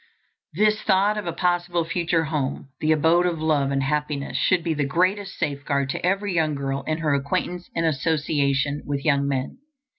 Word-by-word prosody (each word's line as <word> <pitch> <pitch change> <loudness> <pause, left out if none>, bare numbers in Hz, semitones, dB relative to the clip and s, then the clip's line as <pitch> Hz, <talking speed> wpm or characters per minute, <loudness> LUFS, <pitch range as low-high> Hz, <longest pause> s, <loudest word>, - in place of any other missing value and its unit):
This 215 +3 +2
thought 200 +1 +3
of 210 -4 -4
a - - 0
possible 175 0 0
future 165 -1 0
home, 145 -3 -3
the 155 - +1
abode 165 +3 +4
of 170 -2 -2
love 150 -3 +1
and 135 0 0
happiness, 150 0 -2
should 180 -3 +2
be 165 -1 0
the 150 -1 -1
greatest 185 +7 0
safeguard 140 -1 -1
to - - -5
every 195 +2 0
young 155 -3 +1
girl 135 0 -2
in 155 0 0
her 155 -3 0
acquaintance 145 +5 -2
and 165 - +1
association 145 -1 0
with 140 -1 -3
young 140 -2 +2
men. 135 - -3
155 Hz, 180 wpm, -24 LUFS, 140-175 Hz, -, abode